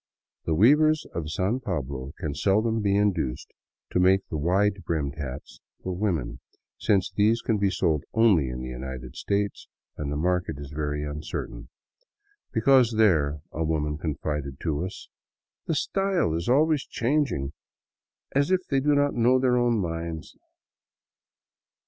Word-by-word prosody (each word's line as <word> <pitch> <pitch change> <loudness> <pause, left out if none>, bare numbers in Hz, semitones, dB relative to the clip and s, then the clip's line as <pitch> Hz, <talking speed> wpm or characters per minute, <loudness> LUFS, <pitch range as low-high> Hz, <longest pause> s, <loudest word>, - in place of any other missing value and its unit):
The 80 - +1
weavers 150 - +5
of 80 -3 -4
San 95 +9 0
Pablo 70 - -4
can 75 -3 -3
seldom 110 +8 +1
be 100 -1 +2
induced 90 -11 -1 0.4
to - - +1
make 95 +1 +4
the 80 - -3
wide 95 +5 +1
brimmed 75 -4 -1
hats 65 -4 -7 0.2
for 95 -1 -3
women, 80 - -2 0.4
since 100 -3 +2
these 110 +3 +2
can 110 -3 +1
be 100 -1 +2
sold 85 -6 0
only 100 - +4
in 60 0 -5
the 65 - -5
United 65 -1 -7
States 100 0 -2 0.3
and 70 -1 -3
the 75 - -2
market 90 -1 0
is 70 0 -8
very 75 0 -2
uncertain, 75 -5 -6 0.4
" 410 0 -43
because 120 0 +4
there," 75 -9 +3
a 80 - -2
woman 75 -1 -1
confided 75 -3 -3
to 80 -1 -1
us, 95 - -7 0.3
" - - -68
the 160 - 0
style 195 - 0
is 85 +5 -2
always 150 +2 +3
changing, 120 - -1 0.8
as 140 +4 +2
if 185 -1 +3
they 135 - +3
do 145 +2 +2
not 145 0 +2
know 120 +2 +4
their 130 -1 +2
own 120 -1 +2
minds." 85 -3 -4
90 Hz, 155 wpm, -26 LUFS, 75-115 Hz, 0.8 s, weavers